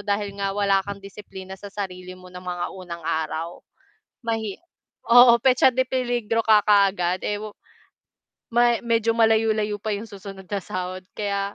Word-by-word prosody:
dahil 205 Hz, 0 st, -2 dB
nga 200 Hz, -1 st, -1 dB
wala 200 Hz, -1 st, +3 dB
kang 200 Hz, 0 st, -6 dB
disiplina 190 Hz, -1 st, -10 dB
sa 200 Hz, +2 st, -10 dB
sarili 185 Hz, -2 st, -6 dB
mo 185 Hz, 0 st, -14 dB
ng 180 Hz, -, -8 dB
mga 175 Hz, -1 st, -3 dB
unang 175 Hz, -3 st, -8 dB
araw. 160 Hz, +2 st, -3 dB, 0.7 s
Mahi 225 Hz, -3 st, -2 dB, 0.6 s
oo 245 Hz, 0 st, +9 dB
petsa 255 Hz, 0 st, +5 dB
de 260 Hz, -, +2 dB
peligro 240 Hz, -3 st, 0 dB
ka 215 Hz, -1 st, +6 dB
kaagad, 195 Hz, -3 st, +3 dB
eh, 205 Hz, -, -1 dB
wu 215 Hz, 0 st, -6 dB, 1.0 s
ma 240 Hz, 0 st, +4 dB
medyo 230 Hz, -1 st, +2 dB
malayo-layo 220 Hz, -2 st, +2 dB
pa 215 Hz, -1 st, -2 dB
yung 210 Hz, -, -6 dB
susunod 195 Hz, -1 st, -10 dB
sa 200 Hz, -1 st, -1 dB
sahod 185 Hz, +1 st, -5 dB
kaya, 200 Hz, -1 st, -2 dB
205 Hz, 155 wpm, -24 LUFS, 185-225 Hz, 1.0 s, oo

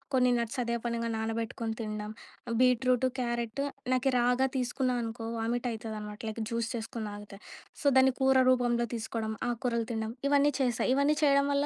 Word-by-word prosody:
కొన్ని 250 Hz, -1 st, +4 dB
నట్స్ 235 Hz, +2 st, -3 dB
అదే 235 Hz, 0 st, -1 dB
పనిగా 230 Hz, -1 st, -1 dB
నానబెట్టుకొని 225 Hz, 0 st, -3 dB
తినడం, 215 Hz, 0 st, -4 dB, 0.5 s
బీట్రూట్, 255 Hz, 0 st, +3 dB
క్యారెట్ 235 Hz, +1 st, -2 dB, 0.3 s
నాకు 255 Hz, +1 st, +2 dB
రాగా 250 Hz, +2 st, +3 dB
తీసుకున్న 250 Hz, 0 st, 0 dB
అనుకో, 225 Hz, 0 st, -5 dB
వామిట్ 240 Hz, +2 st, -1 dB
ఐతదనమాట 215 Hz, -1 st, -6 dB
లైక్ 220 Hz, +1 st, -5 dB
జ్యూస్ 230 Hz, -1 st, -1 dB
చేసుకొని 225 Hz, -1 st, -4 dB
తాగుత. 205 Hz, 0 st, -9 dB, 0.5 s
సో, -, -, -14 dB
దాన్ని 265 Hz, 0 st, +6 dB
కూర 265 Hz, 0 st, +4 dB
రూపంలో 240 Hz, -2 st, +2 dB
తీసుకోవడం, 220 Hz, 0 st, -3 dB, 0.2 s
ఆకుకూరలు 235 Hz, -1 st, -1 dB
తినడం 220 Hz, 0 st, -2 dB, 0.2 s
ఇవన్నీ 285 Hz, 0 st, +4 dB
చేశా 245 Hz, -3 st, +1 dB
ఇవన్నీ 290 Hz, +2 st, +3 dB
చేయడం 280 Hz, -1 st, +4 dB
వల్ల 285 Hz, +1 st, +2 dB
235 Hz, 155 wpm, -30 LUFS, 225-255 Hz, 0.5 s, దాన్ని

